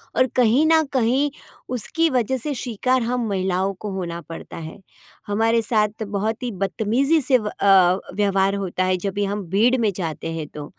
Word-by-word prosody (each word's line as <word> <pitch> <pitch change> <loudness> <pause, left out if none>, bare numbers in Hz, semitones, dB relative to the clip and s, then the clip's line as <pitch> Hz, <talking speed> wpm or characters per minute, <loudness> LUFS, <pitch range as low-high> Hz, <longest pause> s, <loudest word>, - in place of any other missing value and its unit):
और 255 - +4
कहीं 250 +4 +4
न 320 0 +5
कहीं, 260 +3 +2 0.4
उसकी 315 +7 0
वजह 260 -1 0
से 285 +4 -3
शिकार 255 +1 0
हम 245 +1 -1
महिलाओं 190 0 0
को 210 - -5
होना 170 -3 -4
पड़ता 165 +1 -9
है। 160 -1 -8 0.5
हमारे 225 +3 +2
साथ 215 -1 0
बहुत 210 +3 -3
ही 245 - -2
बदतमीज़ी 225 - +1
से 260 -1 +4
व 215 -3 -5
अ, 190 -3 +4 0.2
व्यवहार 195 -1 +2
होता 185 -2 -2
है 185 0 +1
जब 195 +2 -3
भी 205 +1 0
हम 200 +1 -3
भीड़ 225 +7 +3
में 215 -2 +2
जाते 165 -2 -4
हैं 160 -2 -5
तो। 150 -1 -6
210 Hz, 185 wpm, -22 LUFS, 190-250 Hz, 0.5 s, न